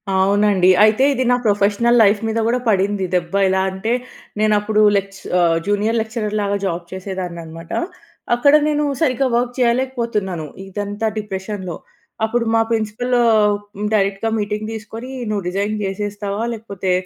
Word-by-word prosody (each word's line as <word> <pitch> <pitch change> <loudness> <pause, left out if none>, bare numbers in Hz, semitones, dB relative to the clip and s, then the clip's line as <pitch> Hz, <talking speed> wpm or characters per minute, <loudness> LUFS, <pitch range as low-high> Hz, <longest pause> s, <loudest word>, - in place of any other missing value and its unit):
అవునండి. 195 -1 +3
అయితే, 215 +5 +4
ఇది 260 - 0
నా - - +5
ప్రొఫెషనల్ 210 +4 +3
లైఫ్ 205 0 +4
మీద 225 +1 -1
కూడా 250 +2 +1
పడింది 195 -1 +1
దెబ్బ. 175 0 -1
ఇలా 190 0 +2
అంటే, 195 +5 -2 0.5
నేను 215 0 +3
అప్పుడు 215 +1 +1
లేచ్ 195 0 -2 0.2
ఆహ్, 165 -1 +3
జూనియర్ 210 +3 +1
లెక్చరర్ 220 -1 -3
లాగా 200 0 0
జాబ్ 170 -1 -2
చేసేదాన్ననమాట. 175 -3 -6 0.6
అక్కడ 285 +4 +4
నేను 300 0 +1 0.2
సరిగ్గా 270 -3 +2
వర్క్ 245 +1 0
చేయలేకపోతున్నాను. 235 -8 0 0.2
ఇదంతా 205 +2 -3
డిప్రెషన్‌లో. 190 -3 -5 0.5
అప్పుడు 230 +1 -1
మా 225 - +4
ప్రిన్సిపల్ 225 +2 -1
ఆహ్, 210 -2 +4 0.4
డైరెక్ట్‌గా 200 +2 +1
మీటింగ్ 210 +1 -3
తీసుకొని, 225 +3 -8 0.2
నువ్వు 205 -3 -2
రిజైన్ 200 +3 -1
జేసేస్తావా, 205 +1 -3
లేకపోతే 200 -4 -4
210 Hz, 135 wpm, -19 LUFS, 195-225 Hz, 0.6 s, నా